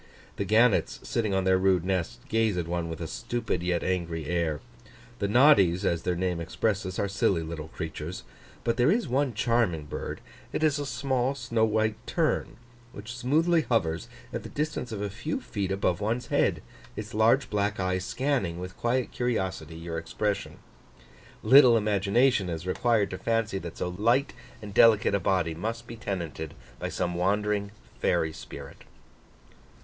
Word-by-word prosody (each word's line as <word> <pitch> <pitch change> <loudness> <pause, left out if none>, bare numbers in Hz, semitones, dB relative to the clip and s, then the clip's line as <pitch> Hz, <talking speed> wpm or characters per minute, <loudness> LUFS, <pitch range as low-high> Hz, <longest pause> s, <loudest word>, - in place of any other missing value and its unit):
The 100 - -1
gannets, 110 +3 +3
sitting 110 -4 -1
on 95 - +1
their 95 0 +3
rude 95 -2 +3
nests, 95 -3 -1
gaze 110 -4 +1
at 85 -2 -2
one 85 -1 -2
with 80 0 -6
a - - -2
stupid 120 -2 -3
yet 90 -1 0
angry 85 -4 -2
air. 80 -2 0 0.6
The 100 - 0
noddies, 100 - +5
as 85 -1 +1
their 90 - -1
name 90 -1 -1
expresses, 95 +3 -1
are 100 - 0
silly 95 -3 +1
little 80 -1 -6
creatures. 80 0 -6 0.4
But 115 0 0
there 125 +2 +4
is 225 +5 +2
one 130 -1 0
charming 115 -9 +1
bird: - - -5 0.3
it - - -1
is 150 -2 +3
a 145 - -3
small, 130 -1 0
snow 115 -3 +1
white 110 0 +1
tern, 165 -3 0 0.4
which 110 +4 -8
smoothly 160 +7 +2
hovers 85 - 0 0.2
at - - -2
the - - -9
distance 150 -5 -3
of 105 -2 -3
a 105 - -2
few 120 +10 -3
feet 100 -3 -3
above 95 -2 0
one's 115 +4 -1
head, - - +1 0.3
its 105 +2 -6
large 115 +5 +3
black 105 0 0
eye 95 0 0
scanning, 105 -3 -1
with 90 +1 -7
quiet 125 +1 0
curiosity, 95 -10 -2
your 80 0 -4
expression. 100 +5 -3 0.9
Little 130 -3 +8
imagination 105 +1 +2
is 85 0 -4
required 105 +2 +1
to 95 - -5
fancy 115 -3 0
that 85 -2 -8
so 90 - -2
light 115 +10 +1 0.3
and 100 -1 -7
delicate 110 -3 +5
a 100 - +3
body 90 -4 +1
must 115 +7 -4
be 115 - -8
tenanted 85 -8 -5 0.2
by - - -3
some 90 -1 -2
wandering 100 +3 0 0.3
fairy 80 -2 +1
spirit. 80 - -10
100 Hz, 165 wpm, -28 LUFS, 90-115 Hz, 0.9 s, Little